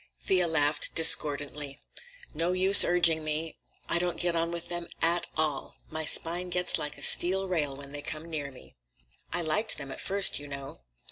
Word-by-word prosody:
Thea 185 -2 0
laughed 150 -2 -1
discordantly. 145 -3 +3 0.6
"No 165 +3 -2
use 190 +2 +9
urging 170 -3 +1
me. 155 +1 -5 0.3
I 170 - -1
don't 175 0 -4
get 175 -1 -2
on 165 0 -2
with 170 0 -7
them 175 -1 -6
at 170 +1 0
all. 155 -3 -1 0.2
My 160 0 -5
spine 175 +4 0
gets 180 0 0
like 150 0 -7
a - - -5
steel 190 +2 +3
rail 150 -7 -3
when 140 0 -12
they 145 0 -7
come 155 +2 -8
near 150 -4 -6
me. 130 - -17 0.6
I 175 0 -3
liked 210 +8 -2
them 140 -2 -8
at - - -8
first, 200 -4 0
you 145 - -11
know. 140 - -10
165 Hz, 185 wpm, -26 LUFS, 145-175 Hz, 0.6 s, use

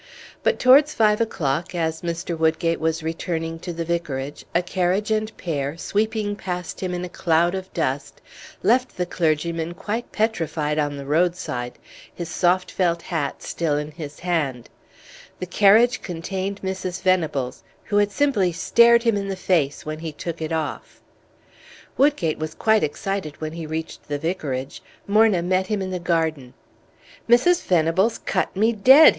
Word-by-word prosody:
But - - +2
towards 280 +4 +6
five 210 0 +3
o'clock, 165 -6 -1
as 160 -1 -1
Mr. 170 0 -3
Woodgate 160 +1 +1
was 160 0 -1
returning 165 0 -3
to 175 - -5
the 165 0 -4
Vicarage, 150 -5 -3
a 175 - +3
carriage 185 +4 0
and 215 0 0
pair, 145 -2 -3
sweeping 210 +2 -1
past 180 -3 -5
him 180 -1 -2
in 175 0 -3
a - - -5
cloud 170 0 +1
of 190 0 -5
dust, - - -2 0.4
left 255 +1 +2
the 180 - 0
clergyman 165 0 -1
quite 220 +6 -4
petrified 165 -8 -1
on 145 -1 -1
the 140 - -7
roadside, 150 -6 0 0.4
his 170 -1 -5
soft 180 +1 +1
felt 170 -2 0
hat 155 -6 -3
still 155 -3 -1
in 150 +1 -4
his 150 -2 -9
hand; 150 -9 -2 0.7
the - - -3
carriage 210 +6 +4
contained 190 +3 -4
Mrs. 190 -1 -3
Venables, 160 -9 0 0.2
who 205 - -1
had 205 0 +4
simply 215 -8 +2
stared 235 +7 +5
him 230 -3 +3
in 200 -1 -2
the 195 - -2
face 160 -7 0
when 155 0 -4
he 160 -1 -5
took 165 +2 -6
it 160 0 -3
off. 160 -2 -4 1.0
Woodgate 270 - +2
was 155 0 -4
quite 220 -1 +3
excited 155 +1 -3
when 155 0 -4
he 165 -1 -6
reached 160 +1 -5
the 145 0 -2
Vicarage. 145 -5 -3 0.2
Morna 210 -3 +4
met 185 +1 +1
him 210 0 -1
in 190 -1 -3
the 180 - -2
garden. 160 -7 -1 0.7
"Mrs. 340 +10 +5
Venables 180 +6 +2
cut 185 - -2
me 220 +4 +3
dead!" 265 +9 +8
175 Hz, 160 wpm, -23 LUFS, 160-200 Hz, 1.0 s, dead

